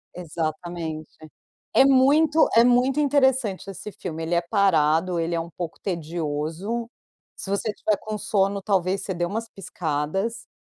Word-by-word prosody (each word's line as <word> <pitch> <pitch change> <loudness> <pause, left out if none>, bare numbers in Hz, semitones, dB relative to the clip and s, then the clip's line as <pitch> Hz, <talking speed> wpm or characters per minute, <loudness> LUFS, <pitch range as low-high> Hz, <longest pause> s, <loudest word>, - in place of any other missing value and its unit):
Exatamente. 160 -1 -4 0.6
É - - +6
muito 285 +4 +4
é 230 - +8
muito 250 +3 +3
interessante 265 -9 +2
esse 195 +2 -7
filme. 165 -4 -6
Ele 165 +2 -2
é 170 - +3
parado, 170 -2 +2
ele 165 +1 -1
é - - 0
um 165 +1 -5
pouco 170 -1 -6
tedioso. 170 +5 -3 0.5
Se - - -8
você 200 +2 -1
estiver 210 0 0
com 215 0 -4
sono, 200 -1 0
talvez 190 -1 0
você 190 - -3
dê 175 0 -1
umas 225 +5 -4
piscadas. 180 +3 -3
190 Hz, 145 wpm, -24 LUFS, 165-230 Hz, 0.6 s, é